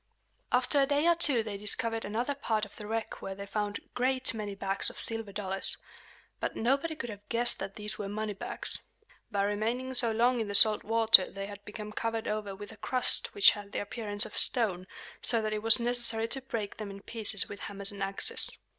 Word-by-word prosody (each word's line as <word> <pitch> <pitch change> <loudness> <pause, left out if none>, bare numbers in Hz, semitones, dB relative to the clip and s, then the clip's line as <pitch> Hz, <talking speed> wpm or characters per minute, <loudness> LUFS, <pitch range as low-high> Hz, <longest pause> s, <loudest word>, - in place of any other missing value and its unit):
After 255 +3 +2
a 275 - +2
day 290 +3 +2
or 340 - +6
two 290 -9 +4
they 210 -2 -5
discovered 225 +2 -1
another 235 +7 -2
part 220 -6 -1
of 200 - -16
the 210 - -9
wreck 225 +1 -4
where 195 - -5
they 200 +1 -7
found 205 0 -3
a - - -14
great 255 0 0
many 210 -3 -5
bags 195 0 0
of - - -12
silver 225 -2 -4
dollars. 195 -1 -1 0.6
But - - -3
nobody 275 +7 0
could 240 -6 -6
have 205 0 -13
guessed 240 0 +2
that 195 0 -6
these 210 0 -5
were 200 -1 -4
money 215 +1 -3
bags. 195 - -4 0.5
By 200 -1 0
remaining 225 +6 -2
so 240 -2 +5
long 240 +2 +2
in 220 - -2
the 200 - -2
salt 215 +1 +7
water 225 -3 +5
they 195 0 -6
had 205 0 -10
become 210 0 -8
covered 225 +1 -3
over 210 -2 -3
with 205 +2 -10
a 220 - -13
crust 255 - 0
which 410 - +8
had 205 -1 -9
the - - -1
appearance 205 0 0
of - - -10
stone, 190 -7 +1 0.3
so 230 - +4
that 215 -1 -2
it 210 - -2
was 225 +2 +5
necessary 235 -2 +3
to 270 - +1
break 225 -5 -5
them 215 -2 -6
in 195 0 -10
pieces 215 -3 0
with 200 - -9
hammers 200 0 0
and 200 -1 -9
axes. 195 0 +1
215 Hz, 215 wpm, -30 LUFS, 205-240 Hz, 0.6 s, which